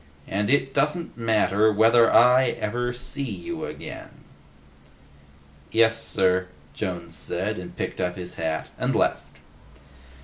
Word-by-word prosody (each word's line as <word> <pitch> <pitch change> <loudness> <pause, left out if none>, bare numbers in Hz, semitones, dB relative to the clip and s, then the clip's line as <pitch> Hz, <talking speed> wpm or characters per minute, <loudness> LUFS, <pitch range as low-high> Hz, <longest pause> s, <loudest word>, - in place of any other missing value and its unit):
And, 105 +2 -1
it 135 -1 +2
doesn't 160 +4 0
matter 110 -2 +2
whether 115 +2 +5
I 125 +2 +5
ever 120 +3 -2
see 125 +3 -5
you 100 -10 -5
again!" - - -9 1.5
"Yes, 115 0 +3
sir," 90 -1 +1 0.3
Jones 85 -2 -5
said, 95 +3 -3
and 90 - -10
picked - - -3
up 90 0 -1
his 90 -1 -6
hat 80 -1 -3
and - - 0
left. - - -1
105 Hz, 125 wpm, -24 LUFS, 90-120 Hz, 1.5 s, whether